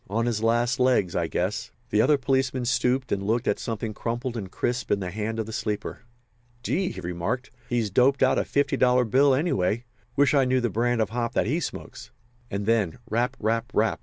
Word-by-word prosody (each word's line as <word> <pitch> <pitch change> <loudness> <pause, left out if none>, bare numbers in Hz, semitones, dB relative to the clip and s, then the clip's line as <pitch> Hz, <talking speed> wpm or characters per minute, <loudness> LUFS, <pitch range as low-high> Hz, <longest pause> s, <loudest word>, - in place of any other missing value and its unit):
On 115 +4 0
his 115 -3 -1
last 120 +3 +1
legs, 125 -9 +2
I 85 -1 0
guess." 95 +5 -2 0.2
The 105 - +4
other 145 +5 +4
policeman 130 -1 0
stooped 125 +1 +1
and 100 - 0
looked 115 +4 0
at - - +1
something 115 -2 -4
crumpled 120 +3 -3
and 100 -5 -5
crisp 125 +1 -2
in 100 - +2
the 90 -2 -4
hand 110 +3 -3
of 110 - -1
the 110 - -8
sleeper. 105 -1 -3 0.6
"Gee!" 185 +7 0
he - - -7
remarked. 90 +9 -3 0.2
"He's 115 -4 0
doped 130 +6 +3
out - - +4
a - - +1
fifty 140 -1 0
dollar 125 -1 +4
bill, 135 +4 +4
anyway. 120 - 0 0.3
Wish 140 -2 +4
I 140 -2 +4
knew 130 0 +2
the 120 -3 -1
brand 120 +2 +1
of 110 - -1
hop 120 0 -2
that - - +1
he 145 +10 0
smokes." - - -7 0.4
And 100 +1 -3
then 110 -5 +1
"Rap, 125 +4 0
rap, 115 +2 0
rap!" 110 +1 +2
120 Hz, 210 wpm, -26 LUFS, 110-130 Hz, 0.6 s, The